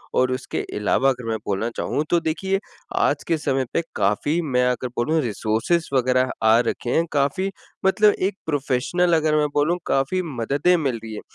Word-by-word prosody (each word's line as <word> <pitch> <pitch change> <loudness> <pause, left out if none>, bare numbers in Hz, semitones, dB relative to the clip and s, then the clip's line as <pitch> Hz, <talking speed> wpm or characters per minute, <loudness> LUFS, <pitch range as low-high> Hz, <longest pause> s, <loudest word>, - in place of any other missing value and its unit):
और 130 0 +3
उसके 130 - -3 0.2
अलावा 115 +6 +2
अगर 125 -2 -3
मैं 110 - 0
बोलना 100 +3 -1
चाहूँ 150 - -1
तो 175 - +3
देखिए, 190 +5 -1 0.4
आज - - +1
के 165 - +2
समय 135 -3 0
पे - - +2
काफ़ी 145 - +1
मैं 125 -6 +1
अगर 125 0 -2
बोलूँ 155 +7 +1
रिसोर्सेस 115 - 0
वग़ैरह 130 0 +2
आ 110 +1 +6
रखे 120 - -3
हैं 165 - +3
काफ़ी 145 +7 0 0.4
मतलब 210 +2 +5 0.2
एक 205 - -13
प्रोफेशनल 145 +4 0
अगर 155 -1 +1
मैं 150 -1 +2
बोलूँ 155 +4 +2
काफ़ी 135 +8 +1
मददें 140 +9 +2
मिल 135 -7 -1
रही 110 -1 -7
हैं, 105 - -6
140 Hz, 180 wpm, -22 LUFS, 125-165 Hz, 0.4 s, आ